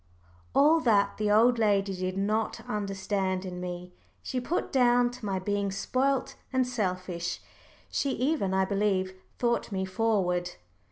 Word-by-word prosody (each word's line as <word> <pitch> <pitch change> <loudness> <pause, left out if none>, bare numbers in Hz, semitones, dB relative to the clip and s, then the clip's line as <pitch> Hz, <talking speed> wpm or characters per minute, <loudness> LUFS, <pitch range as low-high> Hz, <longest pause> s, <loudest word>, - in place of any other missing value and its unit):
All 305 +4 +6
that 205 -8 +2
the 210 -1 0
old 230 +3 +5
lady 200 -3 +2
did 185 +1 -3
not 215 +3 -1
understand 195 -3 -2
in 180 -1 -6
me, 180 0 -6 0.3
she 255 - -2
put 330 +8 -2
down 245 -2 +4
to 245 - -12
my 195 -1 0
being 200 +1 -1
spoilt 260 +6 0 0.2
and 260 -1 +2
selfish. 185 -7 -2 0.5
She 280 - 0
even, 260 -7 0
I 190 0 +2
believe, 195 -2 0 0.2
thought 235 -2 0
me 190 -1 -1
forward. 185 -4 0
205 Hz, 145 wpm, -28 LUFS, 190-240 Hz, 0.5 s, All